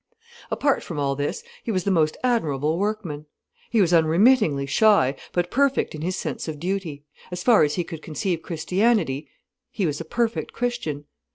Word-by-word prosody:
Apart 280 -2 +1
from 165 - -7
all 140 -1 0
this, 145 - -3 0.2
he 230 - -2
was 185 -4 0
the 200 - +1
most 155 -4 +2
admirable 160 - +1
workman. 195 -8 -3 0.4
He 225 - +3
was 175 -2 +2
unremittingly 165 - +4
shy, 145 -4 +4 0.2
but 175 0 -1
perfect 275 +1 +1
in 155 - -7
his 180 +3 -1
sense - - -4
of 155 -2 -5
duty: 170 -5 -3 0.3
as 180 0 -5
far 235 -4 +6
as 150 -1 +2
he 175 - 0
could 165 -2 -8
conceive 165 +3 -2
Christianity, 175 - 0 0.4
he 200 - -2
was 150 -1 -2
a - - -7
perfect 235 -1 -1
Christian. 235 -13 -3
175 Hz, 175 wpm, -24 LUFS, 150-215 Hz, 0.4 s, far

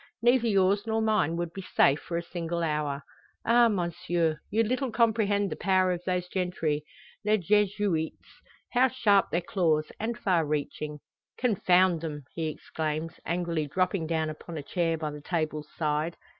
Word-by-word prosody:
Neither 240 0 +4
yours 200 0 +2
nor 220 0 +1
mine 215 -7 +1
would 170 -1 -3
be 195 - -6
safe 145 -5 +3
for 170 - -4
a 170 - -2
single 170 0 -3
hour. 150 -3 -1 0.4
Ah 235 +1 +6
monsieur! 170 -4 0
you 225 +3 +2
little 255 +3 -1
comprehend 215 -3 +2
the - - -2
power 185 -1 +2
of 175 -1 -2
those 180 -1 0
gentry, 175 -5 -1 0.4
les 210 +1 +3
Jesuites 200 -3 0 0.3
how 255 +1 +5
sharp 215 -6 +3
their 170 - 0
claws, 165 -4 +1
and 235 +2 -2
far 180 -7 +2
reaching!" 150 0 -3 0.4
"Confound 185 -7 +3
them!" 150 -3 -5
he 165 -1 -2
exclaims, 155 +1 -4
angrily 170 -3 -1
dropping 185 +1 0
down 160 -1 0
upon 160 +2 -8
a 145 - -5
chair 165 +1 0
by 155 -1 -3
the 150 0 -8
table's 155 -2 -2
side. 155 +1 -1
175 Hz, 160 wpm, -28 LUFS, 155-205 Hz, 0.4 s, Ah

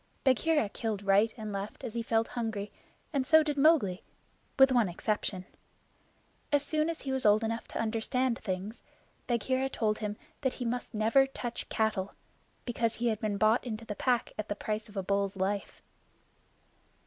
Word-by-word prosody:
Bagheera 275 0 +3
killed 210 -1 -3
right 200 +3 +4
and 215 -2 -5
left 200 +1 -5
as 225 - -5
he 235 - -1
felt 225 0 +1
hungry, 220 -4 -3 0.4
and 275 -2 +2
so 315 -1 +7
did 300 -1 -1
Mowgli 275 - +4 0.6
with 270 -1 +7
one 240 -6 +3
exception. 190 0 -2 1.1
As 290 -1 +3
soon 310 +2 0
as 330 - -4
he 270 - -3
was 265 -1 +4
old 210 +1 +5
enough 225 0 -2
to - - -5
understand 230 +2 0
things, 195 +2 -4 0.5
Bagheera 260 +3 0
told 215 -4 0
him 210 -1 -3 0.2
that 260 -3 0
he 245 - -5
must 245 0 -3
never 225 +6 +4
touch 245 -3 -6
cattle 220 -3 -1 0.5
because 230 -2 0
he 235 +1 0
had 215 -2 -1
been 210 -2 -1
bought 220 +3 +3
into 225 -2 -5
the 210 - -4
Pack 245 +3 0
at 215 - -4
the 205 - -1
price 215 +1 -3
of 205 - -11
a 195 - -1
bull's 200 +1 0
life. 195 +1 -2
225 Hz, 175 wpm, -30 LUFS, 210-255 Hz, 1.1 s, so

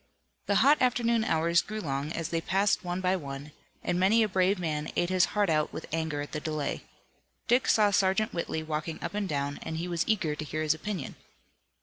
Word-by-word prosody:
The 200 - +2
hot 290 +2 +5
afternoon 235 -2 +2
hours 170 -1 +2
grew 215 0 -6
long 140 -3 -3
as 165 -1 -3
they 165 -1 -1
passed 195 +4 +1
one 175 +1 -3
by 185 0 +2
one, 140 -3 -6 0.3
and 175 - 0
many 215 +5 +4
a - - +2
brave 190 0 +2
man 155 -4 -3
ate 175 +1 +1
his 185 -1 +4
heart 205 -1 +4
out 155 -2 +1
with - - -6
anger 160 -3 -1
at 145 - -7
the 150 - -3
delay. 155 -2 -3 0.7
Dick 245 +2 +3
saw 210 -2 +4
Sergeant 195 +2 +2
Whitley 165 -2 -2
walking 155 +1 -3
up - - -4
and 205 -2 -2
down, 140 -1 -2
and 160 - -4
he 170 +2 -3
was 170 -1 0
eager 185 -9 +1
to 150 - -5
hear 155 +1 -3
his 155 -1 +3
opinion. 170 -2 -5
175 Hz, 215 wpm, -29 LUFS, 155-200 Hz, 0.7 s, hot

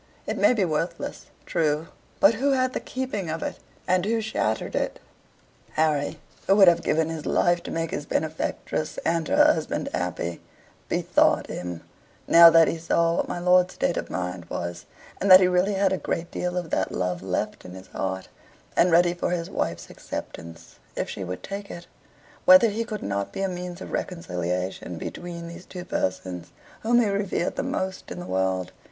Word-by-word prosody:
It - - -2
may 250 - +4
be 205 -4 +2
worthless 170 +1 -3 0.2
true: 155 0 0 0.3
but 200 +3 +6
who 275 +5 +1
had 255 -1 +1
the - - -1
keeping 255 -9 -4
of 160 +1 -3
it, - - -4 0.3
and 185 -1 +2
who 225 +3 +1
shattered 215 - -1
it? - - -1 0.8
Harry, 155 -2 +1 0.3
who 195 - +5
would 195 -2 +7
have 170 -1 +6
given 160 0 +1
his 160 -2 -5
life 175 0 +2
to - - -8
make 165 0 -2
his 145 - -4
benefactress 155 0 -2
and 165 -2 +1
her - - +5
husband - - -3
happy, 90 -1 -3 0.5
bethought - - +2
him, 90 -2 -5 0.5
now 170 0 +10
that 165 -1 +6
he 165 - -2
saw 170 +1 +1
what - - 0
my - - -3
lord's 180 +1 +3
state 175 - 0
of - - -4
mind 90 -1 -4
was, 85 0 -5 0.3
and 195 - +1
that 185 0 +11
he 185 - +4
really 180 +3 +2
had 190 -1 +2
a - - 0
great 170 0 -3
deal 180 0 -2
of 175 -3 -4
that 95 - 0
love 90 -1 -2
left 95 +3 -3
in 90 0 -10
his 95 0 -12
heart, 95 0 -3 0.5
and 180 - +4
ready 175 +1 +5
for 175 - -2
his 170 -1 -2
wife's - - -3
acceptance 85 0 -8 0.2
if - - -3
she 95 - -5
would 90 0 -6
take 200 0 -6
it, 175 0 -8 0.6
whether 275 -4 +8
he 220 +3 -2
could 215 -3 -6
not 100 0 -2
be 195 - -3
a - - +2
means 180 0 -6
of - - -7
reconciliation 90 - -3
between 170 - -6
these 170 +2 -10
two 180 -1 -8
persons, 90 - -3 0.3
whom 240 +2 +3
he 230 - +3
revered 200 -3 -1
the - - -1
most 190 0 -3
in - - -6
the 175 - -6
world. 95 - -1
170 Hz, 190 wpm, -25 LUFS, -, 0.8 s, that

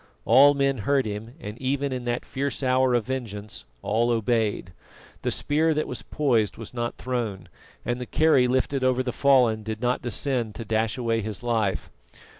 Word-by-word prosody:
All 140 +4 +7
men 135 -2 +1
heard 135 +6 +1
him, 110 +4 -6
and, 105 -4 -8
even 140 +1 -1
in 125 -1 -4
that 120 0 -2
fierce 140 +1 -3
hour 130 -1 +3
of 120 -3 +1
vengeance, 110 - -5 0.2
all 115 +3 +1
obeyed. 110 -5 0 0.5
The - - -1
spear 155 +2 +1
that 155 - 0
was 125 - -5
poised 120 -8 0
was 115 0 -9
not 120 -1 -3
thrown, 115 -8 -3 0.4
and 120 +1 -2
the 125 - -5
kerry 145 -4 +4
lifted 130 +1 0
over 130 0 +2
the 125 - -2
fallen 125 -5 +3
did 110 0 -5
not 125 +1 0
descend 120 -2 -1
to 115 - -6
dash 110 +2 0
away 115 -2 0
his 110 +1 -6
life. 110 -5 -1
120 Hz, 180 wpm, -25 LUFS, 110-130 Hz, 0.5 s, All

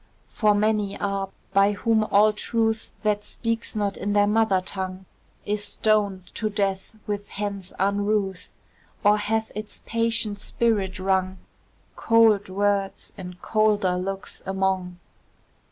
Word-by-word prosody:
For 210 -2 +2
many 210 -1 +1
are 195 -1 -2 0.2
by 200 +1 +4
whom 220 +1 +2
all 215 +1 +4
truth, 225 +1 -1
That 210 -1 +1
speaks 230 +1 -3
not 205 -2 -1
in 205 +1 -2
their 205 0 +5
mother 210 -2 +3
tongue, 185 0 -4 0.4
Is 205 0 -1
stoned 205 -3 +1
to 215 - -2
death 195 0 -2
with 205 -1 -4
hands 200 -2 -4
unruth, 200 0 0 0.5
Or 210 0 +5
hath 220 +2 -1
its 215 0 -7
patient 230 -2 0
spirit 205 -5 0
wrung 190 0 0 0.6
Cold 225 -3 +4
words 200 0 -1
and 180 -2 -9
colder 210 -4 +2
looks 190 +2 -4
among. 190 -2 -1
205 Hz, 125 wpm, -25 LUFS, 195-215 Hz, 0.6 s, their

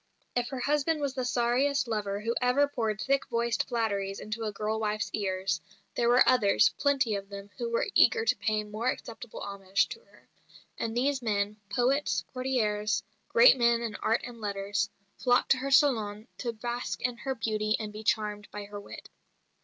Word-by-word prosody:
If 245 -1 +1
her 260 -1 -5
husband 295 +3 +1
was 280 -2 -1
the 260 -2 -2
sorriest 250 +3 +1
lover 205 -3 -2
who 230 +2 -1
ever 250 +3 +3
poured 225 -7 -2
thick 275 +7 +1
voiced 235 -1 0
flatteries 200 -5 -1
into 220 +1 -4
a 215 - -1
girl 215 +1 -2
wife's 215 -1 -1
ears, 190 -4 -1 0.3
there 235 0 +1
were 245 +1 +6
others, 215 -6 +5
plenty 275 -5 +2
of 200 -1 -4
them, 200 0 -9
who 235 -1 -2
were 230 - +1
eager 455 -1 +5
to - - +3
pay 215 -1 0
more 215 +4 -2
acceptable 230 -2 -6
homage 195 -1 0
to - - -7
her; - - -24 0.5
and 230 0 -3
these 270 +1 +1
men 210 -2 -1
poets, 255 +7 +1
courtiers, 225 -5 0 0.3
great 470 - +7
men 235 0 +3
in 225 -2 -3
art 225 +2 +1
and 240 -2 -9
letters 200 -1 -1 0.3
flocked 245 -1 +2
to 270 - +6
her 270 +2 -3
salon 225 -6 +3
to 240 - -2
bask 240 +2 -4
in 245 -1 -1
her 265 +1 -3
beauty 215 -2 0
and 210 -1 -5
to 210 - -7
be - - -8
charmed 210 -1 -1
by 205 - -6
her 205 0 -8
wit. 200 - -10
230 Hz, 185 wpm, -29 LUFS, 210-255 Hz, 0.5 s, great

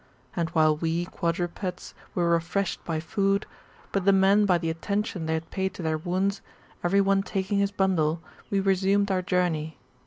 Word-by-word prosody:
And 170 -2 0
while 155 -2 +3
we 165 +2 -1
[quadrupeds] 175 +1 -3 0.2
were 170 -1 +2
refreshed 170 +3 0
with 160 -2 -2
food, 195 +2 +1 0.5
but 195 - 0
the 200 - +5
men 195 +2 +4
by 180 -2 +4
the 165 -1 -2
attention 190 0 -2
they 160 - +1
had 160 0 -5
paid 190 0 -2
to 175 - -6
their 160 -1 0
wounds, 185 +4 -1 0.4
every 195 +3 +3
one 195 0 +3
taking 195 +1 -1
his 200 0 +2
bundle, 175 -5 +1 0.3
we 200 -3 +1
resumed 195 +1 +2
our 185 -1 +1
journey. 175 -4 -1
185 Hz, 175 wpm, -26 LUFS, 165-195 Hz, 0.5 s, the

